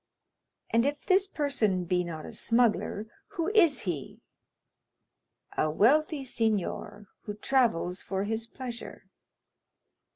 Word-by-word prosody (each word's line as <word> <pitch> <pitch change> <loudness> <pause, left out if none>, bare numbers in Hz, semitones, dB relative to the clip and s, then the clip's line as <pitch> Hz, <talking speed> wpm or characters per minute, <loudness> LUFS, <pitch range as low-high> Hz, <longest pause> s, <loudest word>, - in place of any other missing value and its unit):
"And 230 0 +4
if 285 +2 -2
this 385 +1 +4
person 255 - 0
be 180 0 +1
not 160 -3 -6
a - - -8
smuggler, 230 -3 +1 0.3
who 335 +2 +1
is 370 -9 +4
he?" 170 -8 -4 1.4
"A 155 - +2
wealthy 280 - +3
signor, 210 -3 -1 0.2
who 210 - -4
travels 210 -7 +1
for 195 0 -2
his 225 +2 -2
pleasure." 240 -1 -8
225 Hz, 110 wpm, -29 LUFS, 195-280 Hz, 1.4 s, And